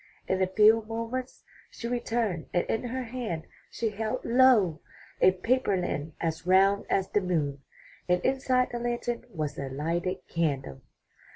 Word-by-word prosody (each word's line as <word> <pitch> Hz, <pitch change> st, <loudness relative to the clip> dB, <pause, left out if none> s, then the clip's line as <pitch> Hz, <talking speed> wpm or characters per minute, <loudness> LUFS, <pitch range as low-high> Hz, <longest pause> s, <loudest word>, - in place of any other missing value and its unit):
In 190 Hz, 0 st, 0 dB
a 185 Hz, -, +3 dB
few 215 Hz, +4 st, +5 dB
moments 230 Hz, +3 st, -4 dB, 0.3 s
she 235 Hz, -, -6 dB
returned 230 Hz, -7 st, -1 dB
and 175 Hz, -, +2 dB
in 225 Hz, +2 st, -2 dB
her 255 Hz, +2 st, -3 dB
hand 225 Hz, -9 st, -4 dB, 0.3 s
she 230 Hz, -, -2 dB
held, 215 Hz, +1 st, -3 dB
lo! 230 Hz, -9 st, +4 dB, 0.4 s
a -, -, +8 dB
paper 200 Hz, +3 st, +1 dB
lantern 160 Hz, -3 st, -3 dB
as 165 Hz, 0 st, -3 dB
round 195 Hz, +2 st, +4 dB
as 190 Hz, -1 st, +1 dB
the 205 Hz, -, +2 dB
moon, 150 Hz, -7 st, -1 dB, 0.5 s
and 180 Hz, 0 st, +4 dB
inside 260 Hz, -1 st, +2 dB
the 240 Hz, -, -3 dB
lantern 240 Hz, 0 st, -2 dB
was 155 Hz, -2 st, -4 dB
a 135 Hz, -, -4 dB
lighted 170 Hz, +7 st, -2 dB
candle! 140 Hz, -, -2 dB
195 Hz, 155 wpm, -28 LUFS, 170-240 Hz, 0.5 s, a